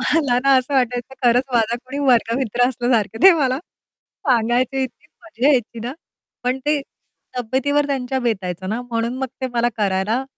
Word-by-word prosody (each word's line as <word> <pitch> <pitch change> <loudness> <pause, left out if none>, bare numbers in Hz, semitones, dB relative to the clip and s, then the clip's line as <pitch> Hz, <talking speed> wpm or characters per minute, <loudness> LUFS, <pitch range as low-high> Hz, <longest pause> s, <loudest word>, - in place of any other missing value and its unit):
मला 270 -2 +2
ना 275 0 +5
असं 255 +2 -3
वाटायचं, 250 0 0
खरंच 245 +1 +4
माझा 230 -1 +2
कोणी 270 +3 -6
वर्गमित्र 245 0 +2
असल्यासारखं, 240 -4 0
"दे 385 - +10
मला." 260 -1 +1 0.7
सांगायचे 245 +2 +2
इतकी 260 +3 -7 0.2
मजा 290 -5 0
यायची 240 -4 0
ना. 250 - -3 0.5
पण 250 +1 0
ते 300 -1 +2 0.6
तब्येतीवर 270 +5 0
त्यांच्या 265 -2 -2
बेतायचं 190 -6 -2
ना 220 +4 -2
म्हणून 235 0 -2
मग 265 - -1
ते 260 - -1
मला 240 0 +2
करायला 205 +4 0
245 Hz, 155 wpm, -20 LUFS, 230-265 Hz, 0.7 s, दे